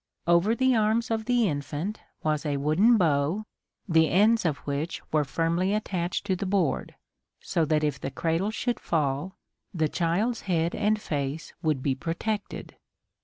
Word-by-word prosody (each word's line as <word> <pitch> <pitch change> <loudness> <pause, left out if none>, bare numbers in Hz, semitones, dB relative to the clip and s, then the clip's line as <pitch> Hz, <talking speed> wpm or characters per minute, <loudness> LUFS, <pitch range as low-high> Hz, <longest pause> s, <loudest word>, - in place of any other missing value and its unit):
Over 170 +6 +3
the 260 +1 +3
arms 220 +1 +1
of 220 -1 -1
the 240 -2 +3
infant 150 +6 -3 0.2
was 155 -1 0
a 145 -2 -1
wooden 170 +12 +4
bow, 160 +3 +1 0.4
the 160 -3 +4
ends 215 +3 +4
of 155 -4 +1
which 145 +4 -2
were 155 -1 +4
firmly 170 +7 0
attached 185 -3 -2
to 190 -2 +1
the 190 +2 -3
board, 185 -6 0 0.4
so 165 - 0
that 155 0 +1
if 145 -2 -1
the - - -3
cradle 165 +7 -1
should 240 +2 -2
fall 150 +3 -1 0.4
the 160 -2 +2
child's 190 +10 0
head 170 -1 +1
and 215 0 +1
face 145 -4 -4
would 155 -6 0
be 140 - +2
protected. 185 +9 -4
170 Hz, 160 wpm, -27 LUFS, 150-210 Hz, 0.4 s, wooden